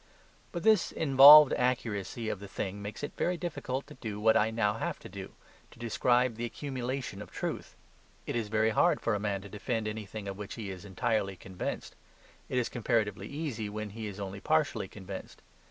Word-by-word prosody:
But 170 Hz, -, -4 dB
this 215 Hz, -3 st, +4 dB
involved 145 Hz, 0 st, +9 dB
accuracy 115 Hz, -3 st, -1 dB
of 105 Hz, -, -2 dB
the 100 Hz, -, -8 dB
thing 95 Hz, +1 st, -4 dB
makes 105 Hz, +4 st, -7 dB
it 145 Hz, -, -3 dB
very 180 Hz, 0 st, 0 dB
difficult 140 Hz, -6 st, -4 dB
to -, -, -12 dB
do 110 Hz, -5 st, -6 dB
what 110 Hz, +1 st, +4 dB
I 110 Hz, -, +4 dB
now 110 Hz, -2 st, +1 dB
have -, -, -3 dB
to -, -, -11 dB
do, -, -, -8 dB, 0.4 s
to -, -, -18 dB
describe 120 Hz, +1 st, +1 dB
this 120 Hz, 0 st, -2 dB
accumulation 130 Hz, -5 st, -4 dB
of -, -, -9 dB
truth. -, -, -5 dB, 0.5 s
It -, -, -3 dB
is 115 Hz, -3 st, -1 dB
very 110 Hz, +1 st, +2 dB
hard -, -, +3 dB
for 115 Hz, -, 0 dB
a 105 Hz, -, 0 dB
man 100 Hz, -2 st, -2 dB
to -, -, -8 dB
defend 110 Hz, +1 st, -2 dB
anything 105 Hz, -1 st, -6 dB
of 100 Hz, +1 st, -6 dB
which 105 Hz, 0 st, -6 dB
he 105 Hz, -4 st, -5 dB
is 95 Hz, +1 st, -9 dB
entirely 100 Hz, 0 st, -1 dB
convinced. 95 Hz, 0 st, -6 dB, 0.5 s
It -, -, -1 dB
is 125 Hz, -, +2 dB
comparatively 105 Hz, -4 st, -1 dB
easy 140 Hz, -8 st, -4 dB
when 105 Hz, 0 st, -5 dB
he 110 Hz, +1 st, -6 dB
is 100 Hz, -1 st, -7 dB
only 100 Hz, 0 st, -5 dB
partially 155 Hz, -6 st, +1 dB
convinced. 95 Hz, -1 st, -9 dB
110 Hz, 195 wpm, -30 LUFS, 100-125 Hz, 0.5 s, involved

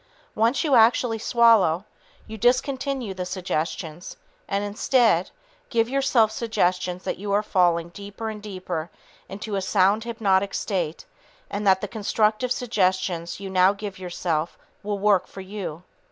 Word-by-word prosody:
Once 230 Hz, +8 st, +2 dB
you 300 Hz, -4 st, +1 dB
actually 230 Hz, -1 st, +4 dB
swallow, 220 Hz, -7 st, +4 dB, 0.4 s
you 220 Hz, -, -8 dB
discontinue 255 Hz, 0 st, 0 dB
the 185 Hz, -1 st, -4 dB
suggestions 175 Hz, -2 st, -4 dB, 0.3 s
and, 200 Hz, +1 st, -1 dB
instead, 205 Hz, -2 st, +2 dB, 0.4 s
give 230 Hz, -2 st, +2 dB
yourself 260 Hz, -4 st, +2 dB
suggestions 185 Hz, -5 st, -1 dB
that -, -, -3 dB
you 200 Hz, +1 st, -4 dB
are 205 Hz, +1 st, +2 dB
falling 175 Hz, -4 st, +2 dB
deeper 200 Hz, +4 st, -8 dB
and 215 Hz, -1 st, -5 dB
deeper 185 Hz, -5 st, -5 dB, 0.4 s
into 205 Hz, +2 st, -5 dB
a 195 Hz, -, 0 dB
sound 195 Hz, +3 st, +2 dB
hypnotic 200 Hz, -4 st, 0 dB
state 175 Hz, -6 st, -2 dB, 0.5 s
and 205 Hz, 0 st, -2 dB
that 190 Hz, -1 st, +5 dB
the 205 Hz, -, -3 dB
constructive 215 Hz, +3 st, 0 dB
suggestions 185 Hz, -8 st, 0 dB
you 200 Hz, -, -6 dB
now 190 Hz, 0 st, +4 dB
give 200 Hz, -2 st, -7 dB
yourself 175 Hz, -3 st, -2 dB, 0.2 s
will 205 Hz, 0 st, -3 dB
work 200 Hz, -2 st, +2 dB
for 195 Hz, -, -10 dB
you. 190 Hz, -4 st, -6 dB
200 Hz, 140 wpm, -24 LUFS, 185-225 Hz, 0.5 s, that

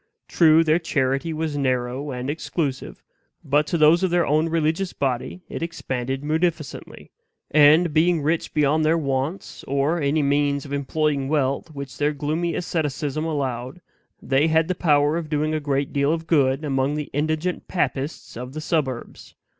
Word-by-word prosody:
True, 160 Hz, -1 st, +5 dB
their 160 Hz, +1 st, +3 dB
charity 135 Hz, -1 st, -1 dB
was 155 Hz, -1 st, -3 dB
narrow 130 Hz, 0 st, -1 dB
and 125 Hz, -1 st, -4 dB
exclusive, 145 Hz, -2 st, -3 dB, 0.4 s
but 145 Hz, +2 st, +2 dB
to 170 Hz, -, 0 dB
those 160 Hz, +3 st, +5 dB
of 190 Hz, -, +1 dB
their 175 Hz, 0 st, +2 dB
own 155 Hz, +3 st, +2 dB
religious 165 Hz, +3 st, 0 dB
body 135 Hz, +6 st, -3 dB
it -, -, -6 dB
expanded 135 Hz, -5 st, -3 dB
munificently; 160 Hz, 0 st, -3 dB, 0.4 s
and, 155 Hz, +2 st, +5 dB
being 165 Hz, 0 st, +3 dB
rich 160 Hz, +3 st, 0 dB
beyond 150 Hz, +1 st, +2 dB
their 160 Hz, +2 st, +3 dB
wants, 140 Hz, +3 st, -3 dB
or 140 Hz, +5 st, 0 dB
any 145 Hz, +2 st, +1 dB
means 140 Hz, 0 st, +1 dB
of 140 Hz, -, -7 dB
employing 140 Hz, 0 st, 0 dB
wealth 140 Hz, 0 st, 0 dB
which 140 Hz, -1 st, -8 dB
their 145 Hz, +1 st, +1 dB
gloomy 155 Hz, +4 st, -2 dB
asceticism 155 Hz, -3 st, -2 dB
allowed, 135 Hz, -2 st, -3 dB, 0.4 s
they 135 Hz, +3 st, +2 dB
had 160 Hz, 0 st, +2 dB
the 185 Hz, -, 0 dB
power 150 Hz, -2 st, +2 dB
of 165 Hz, -3 st, -5 dB
doing 155 Hz, 0 st, 0 dB
a 155 Hz, -, 0 dB
great 140 Hz, -1 st, -2 dB
deal 140 Hz, +1 st, +2 dB
of 165 Hz, 0 st, -2 dB
good 140 Hz, -3 st, +2 dB
among 135 Hz, 0 st, 0 dB
the 150 Hz, -1 st, -5 dB
indigent 155 Hz, +5 st, -1 dB
papists 150 Hz, -4 st, -3 dB
of 125 Hz, +3 st, -7 dB
the 155 Hz, -, -5 dB
suburbs. 140 Hz, -7 st, -3 dB
150 Hz, 160 wpm, -23 LUFS, 140-160 Hz, 0.4 s, True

